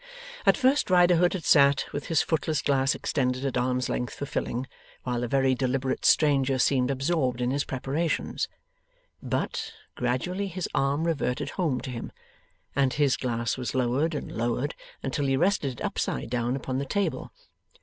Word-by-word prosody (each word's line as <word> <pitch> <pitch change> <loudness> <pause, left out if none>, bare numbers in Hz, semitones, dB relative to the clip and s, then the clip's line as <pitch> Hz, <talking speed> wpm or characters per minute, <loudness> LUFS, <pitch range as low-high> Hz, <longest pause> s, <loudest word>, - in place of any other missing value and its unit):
At - - +6
first 265 0 +3
Riderhood 180 -1 +5
had 185 -4 -4
sat 140 -2 +5
with 145 - -4
his 165 -3 +2
footless 155 -1 0
glass 135 -1 +2
extended 130 -1 -1
at 135 - -1
arm's 125 +1 0
length 125 - -3
for 145 - -4
filling, 125 -2 -3 0.4
while 125 -1 -2
the 120 - -1
very 135 +1 +2
deliberate 130 +1 -1
stranger 140 -3 +4
seemed 130 0 +2
absorbed 135 -2 0
in 125 0 0
his 140 +1 0
preparations. 140 +5 -2 0.7
But, - - -2 0.2
gradually 180 +11 -1
his 185 -1 -4
arm 140 +3 +1
reverted 145 -3 -1
home 150 -9 -1
to 130 - -6
him, 115 - -6 0.6
and 135 -2 +2
his 145 -4 +3
glass 115 -2 -2
was 125 -3 -4
lowered 130 +6 +1
and - - -5
lowered 120 +5 -1 0.3
until 140 +1 -1
he 135 0 +2
rested 175 -5 +1
it 120 - -5
upside 65 - -2
down 120 0 0
upon 130 -1 -3
the 140 - -2
table. 200 +8 -2
135 Hz, 165 wpm, -27 LUFS, 125-150 Hz, 0.7 s, At